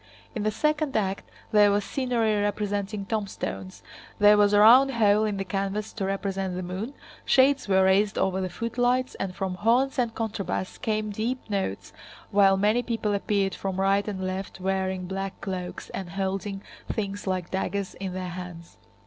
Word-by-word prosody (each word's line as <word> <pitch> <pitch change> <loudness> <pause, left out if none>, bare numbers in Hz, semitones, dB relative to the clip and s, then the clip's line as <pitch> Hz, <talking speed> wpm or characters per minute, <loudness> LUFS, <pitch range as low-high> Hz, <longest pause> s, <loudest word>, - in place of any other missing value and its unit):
In 220 - -3
the 215 - +1
second 300 +3 0
act 195 -2 -2 0.2
there 210 -1 +6
was 200 0 +1
scenery 230 -6 0
representing 205 0 -2
tombstones, 195 -3 -4 0.3
there 210 0 +7
was 205 -1 +4
a 205 - +4
round 250 +6 +8
hole 215 -1 +4
in 210 -2 -1
the 195 - -3
canvas 200 +2 -3
to 200 - -3
represent 195 -1 -2
the 185 - -4
moon, 190 +10 -5 0.3
shades 275 0 +4
were 190 -1 +4
raised 195 +2 +3
over 190 0 +1
the 185 - -2
footlights, 245 +5 0
and 185 -1 -3
from 190 -1 -2
horns 245 +8 +2
and 235 -2 0
contrabass 210 -4 -3
came 215 -1 -1
deep 230 +5 -3
notes 190 - -3 0.4
while 195 -1 +5
many 210 +5 +3
people 225 -4 -1
appeared 200 -1 0
from 190 -1 -4
right 195 +1 +2
and 190 -3 -3
left 185 +1 -4
wearing 190 -1 -1
black 195 +1 -4
cloaks 185 -2 -5
and 190 -2 -5
holding 195 +2 -3 0.3
things 205 -2 -4
like 185 -2 -2
daggers 190 0 -2
in 190 -1 -5
their 185 -1 -4
hands. 175 -1 -9
200 Hz, 170 wpm, -26 LUFS, 190-215 Hz, 0.4 s, round